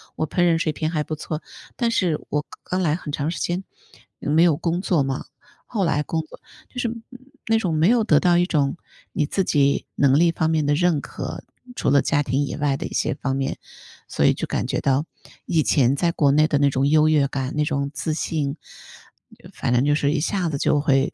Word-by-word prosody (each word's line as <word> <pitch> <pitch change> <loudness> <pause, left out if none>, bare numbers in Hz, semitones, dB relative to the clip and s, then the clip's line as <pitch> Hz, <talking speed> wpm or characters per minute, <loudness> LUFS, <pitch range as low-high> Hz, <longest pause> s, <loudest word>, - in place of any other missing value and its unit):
我 155 - -2
烹 180 - -4
饪 170 -2 +4
水 155 -2 -1
平 155 0 -2
还 155 -3 -1
不 155 - -6
错。” 155 +1 -5 0.3
但 235 -2 +1
是 175 -8 +1
我 150 +1 -1 0.2
刚 185 +1 -2
来 155 -3 +1
很 150 -4 -6
长 145 +2 -1
时 170 - -4
间， 180 +2 -2 0.5
没 155 +3 +1
有 165 -4 +4
工 175 +1 -1
作 170 -7 +1
嘛， 135 0 -3 0.4
后 205 -5 -1
来 150 -2 +1
工 160 +2 -2
作 155 - -14 0.3
就 250 - -5
是 235 - 0 0.6
那 225 0 +3
种， 185 -6 -1
没 160 +3 +3
有 235 -1 +4
得 150 -8 +4
到 175 0 +3
一 175 - +2
种 145 -4 +1 0.4
你 150 - 0
自 195 - 0
己 140 -4 +2
能 140 0 +3
力 170 0 +4
方 160 -1 0
面 155 -2 +1
的 145 - +2
认 170 -1 +2
可， - - -7 0.3
除 - - 0
了 140 - +5
家 145 -2 +1
庭 140 +1 0
以 - - -4
外 140 -2 0
的 - - -4
一 - - -10
些 - - 0
方 135 0 -3
面。 135 -1 -2 0.5
所 - - +1
以 - - +5
就 - - -4
感 - - -2
觉 - - -1
到， 140 +3 +1 0.4
以 160 -2 +2
前 130 +1 +3
在 170 +4 +1
国 145 -4 +2
内 155 +2 +4
的 145 - +1
那 140 0 +3
种 135 +2 +1
优 155 +1 +4
越 150 -3 +3
感、 135 0 -4
那 150 - +1
种 140 -1 -2
自 160 - -3
信， 145 -4 -2 1.0
反 - - -2
正 125 +3 +3
就 145 - +3
是 145 -1 +1
一 155 - 0
下 175 +1 -1
子 140 - -2
就 145 0 +2
会 135 -1 +2
150 Hz, 245 characters per minute, -22 LUFS, 140-170 Hz, 1.0 s, 了